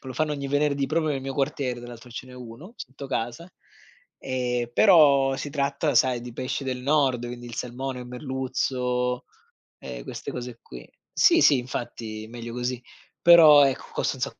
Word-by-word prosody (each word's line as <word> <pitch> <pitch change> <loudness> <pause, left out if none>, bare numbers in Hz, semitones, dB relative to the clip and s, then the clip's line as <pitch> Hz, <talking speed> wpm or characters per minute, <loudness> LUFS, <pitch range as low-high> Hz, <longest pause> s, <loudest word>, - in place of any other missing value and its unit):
lo 130 -1 -7
fanno 155 +3 0
ogni 140 -1 -4
venerdì, 145 -1 +1
proprio 155 +1 0
nel 135 -2 -2
mio 135 0 -5
quartiere, 135 -3 -2
tra 120 - -10
l'altro 120 +1 -12
ce 120 - -8
n'è 130 - -13
uno 125 - -11
sotto 140 -1 -9
casa, 130 +7 -4 0.7
ehm, 125 -2 -2
però 140 - +5
si 145 +1 -5
tratta 140 +1 -1
sai 125 -2 +3
di 120 0 -8
pesci 130 +3 -4
del 130 -1 -3
nord, 135 -3 +1
quindi 120 0 -8
il 120 - -8
salmone, 125 +3 -5
il 125 - -9
merluzzo, 125 -1 -2 0.5
ehm, 60 -2 -8
queste - - -7
cose 125 -1 -7
qui 60 -1 -12 0.2
sì, - - +5
sì 140 - +6
infatti 115 -3 -6
meglio 120 -1 -8
così, 125 0 -3 0.4
però 160 -4 +8
ecco, 135 - -3
costa - - -1
un 130 - -9
sa 135 - +1
130 Hz, 180 wpm, -25 LUFS, 120-140 Hz, 0.7 s, però